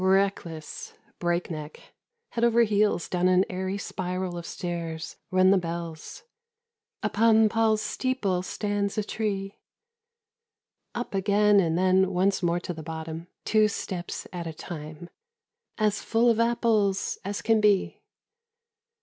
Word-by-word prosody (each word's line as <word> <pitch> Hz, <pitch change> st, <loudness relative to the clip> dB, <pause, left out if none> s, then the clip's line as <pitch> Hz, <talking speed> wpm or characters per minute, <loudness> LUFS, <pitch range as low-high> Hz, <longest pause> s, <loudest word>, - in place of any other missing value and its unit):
Reckless, 190 Hz, -5 st, 0 dB, 0.2 s
break 175 Hz, 0 st, -1 dB
neck, 155 Hz, -1 st, -8 dB, 0.4 s
head 235 Hz, -, -2 dB
over 235 Hz, 0 st, +5 dB
heels 210 Hz, -4 st, +2 dB
down 180 Hz, 0 st, +1 dB
an 185 Hz, +1 st, +4 dB
airy 190 Hz, +1 st, -2 dB
spiral 185 Hz, -2 st, -3 dB
of 170 Hz, -1 st, -6 dB
stairs 170 Hz, -2 st, -5 dB
run 185 Hz, 0 st, +5 dB
the 195 Hz, -, +5 dB
bells. 170 Hz, -, -6 dB, 0.4 s
' 460 Hz, -1 st, -35 dB
Upon 220 Hz, 0 st, +4 dB
Paul's 220 Hz, -1 st, +2 dB
steeple 220 Hz, -9 st, -1 dB
stands 205 Hz, +1 st, -2 dB
a 215 Hz, -, +1 dB
tree.' 200 Hz, -2 st, -3 dB, 1.4 s
Up 240 Hz, -2 st, -4 dB
again 205 Hz, +1 st, +4 dB
and 165 Hz, -3 st, +1 dB
then 185 Hz, +1 st, +4 dB
once 190 Hz, +2 st, +1 dB
more 175 Hz, -1 st, +1 dB
to 175 Hz, -, -4 dB
the 160 Hz, -, -8 dB
bottom, 160 Hz, +1 st, -6 dB, 0.2 s
two 215 Hz, 0 st, +4 dB
steps 185 Hz, -3 st, -5 dB
at 175 Hz, -2 st, -4 dB
a 160 Hz, -, -5 dB
time. 155 Hz, +1 st, -8 dB, 0.3 s
' -, -, -65 dB, 0.3 s
As 210 Hz, -1 st, +1 dB
full 235 Hz, +1 st, +3 dB
of 225 Hz, -, 0 dB
apples 225 Hz, -4 st, +1 dB
as 200 Hz, +1 st, -4 dB
can 225 Hz, -1 st, +3 dB
be.' 205 Hz, -2 st, +2 dB
190 Hz, 140 wpm, -27 LUFS, 175-215 Hz, 1.4 s, over